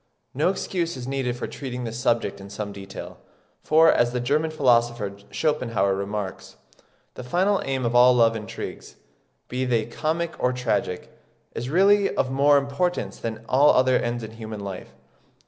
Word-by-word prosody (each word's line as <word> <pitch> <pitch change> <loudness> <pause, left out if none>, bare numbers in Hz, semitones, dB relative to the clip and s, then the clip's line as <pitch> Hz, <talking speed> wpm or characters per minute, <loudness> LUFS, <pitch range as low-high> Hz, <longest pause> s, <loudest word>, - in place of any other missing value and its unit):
No 150 +7 +2
excuse 175 -4 -2
is 125 0 -7
needed 130 -3 -2
for 125 - -4
treating 125 -3 -6
this 115 0 -5
subject 120 -5 0
in 100 - -10
some 100 0 -5
detail; 100 0 -9 0.4
for, 160 +1 +5
as 120 0 +2
the 125 - -1
German 150 +6 +1
philosopher 120 -8 +1
Schopenhauer 115 -11 0
remarks, 100 0 -5 0.6
"the 125 - -8
final 190 +10 +1
aim 135 -2 -1
of 120 - 0
all 125 +1 +6
love 115 -2 +4
intrigues, 105 -3 -7 0.5
be 125 +1 -2
they 120 -4 +1
comic 160 +7 -2
or 125 - +1
tragic, 120 -7 -2 0.4
is 120 +2 -4
really 195 +5 +4
of 130 - 0
more 140 +2 +4
importance 140 - -1
than 115 0 -5
all 140 +3 +5
other 130 0 +4
ends 120 0 -2
in 110 - -7
human 110 -2 -7
life. 95 -2 -8
125 Hz, 165 wpm, -24 LUFS, 110-145 Hz, 0.6 s, all